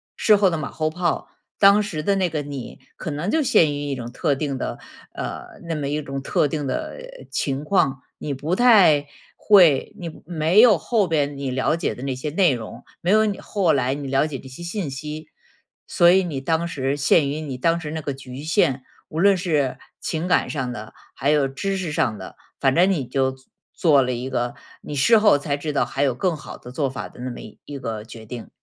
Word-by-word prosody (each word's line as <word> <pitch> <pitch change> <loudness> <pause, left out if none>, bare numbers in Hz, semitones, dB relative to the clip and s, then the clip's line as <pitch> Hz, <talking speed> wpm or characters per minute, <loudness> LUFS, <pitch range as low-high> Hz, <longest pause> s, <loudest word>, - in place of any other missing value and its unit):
事 215 - +5
后 200 -2 +4
的 165 - -2
马 150 - -5
后 155 0 -1
炮， 170 +1 -2 0.3
当 200 +1 +7
时 175 -7 -4
的 200 +4 +2
那 190 -2 +1
个 155 -2 -2
你 140 -3 -7 0.2
可 160 - -5
能 150 +6 -3
就 320 - +2
陷 170 - +4
于 145 - -4
一 140 - -1
种 120 -1 -7
特 140 - 0
定 140 -2 -3
的 - - -4 0.4
呃， - - -7
那 165 - -2
么 145 -2 -3
一 150 +1 -1
种 135 -1 -5
特 145 - +1
定 150 0 -3
的 315 - -4 0.3
情 140 0 -2
况， 135 -7 +1 0.2
你 145 - -3
不 150 +7 -2
太 190 -12 +5 0.3
会， 175 -10 +5
你 165 -2 -8
没 170 +5 +3
有 230 -6 +7
后 215 +5 +1
边 145 -3 0
你 140 -2 -3
了 130 +4 +1
解 165 - -2
的 125 - -9
那 135 -1 -2
些 130 +4 -4
内 170 -1 +3
容， 115 -3 -7 0.2
没 180 - +1
有 215 +1 +5
你 205 -2 -2
后 185 -6 +1
来 130 -1 +1
你 140 -1 -5
了 135 +2 +2
解 145 -4 -5
这 130 - -12
些 130 +6 -11
信 170 -1 -3
息。 150 +3 -7 0.6
所 175 0 +4
以 190 +1 +5
你 145 -6 -4
当 165 +4 0
时 140 -3 -2
限 145 +1 +3
于 150 +2 -3
你 135 -5 -5
当 165 +4 +2
时 155 -3 -6
那 160 0 -4
个 145 - -3
局 130 +1 -9
限， 135 -4 +1 0.3
无 160 - -4
论 200 0 +5
是 150 -7 0 0.2
情 160 +2 -2
感 180 - +2
上 130 -4 -3
的， 110 -1 -9 0.2
还 140 +1 -1
有 145 -2 +3
知 195 +9 -3
识 180 -4 -3
上 140 -9 0
的， 95 - -10 0.2
反 135 -1 +3
正 180 +5 +4
你 150 -9 -1
就 130 +1 0
做 130 0 -19 0.3
做 150 -5 +4
了 125 -1 0
一 125 +1 -4
个， 120 0 -1 0.3
你 150 - -7
事 220 - +5
后 210 -9 +5
才 145 0 -2
知 150 +1 -4
道 145 - +1
还 135 - -4
有 135 -4 +2
更 175 +4 0
好 150 - -9
的 125 - -11
做 140 0 -1
法 130 - -6
的 - - -17
那 130 - -4
么 120 - -7 0.3
一 145 - -7
个 110 -5 -5
决 110 0 -11
定。 115 +1 -8
150 Hz, 245 characters per minute, -22 LUFS, 135-170 Hz, 0.6 s, 当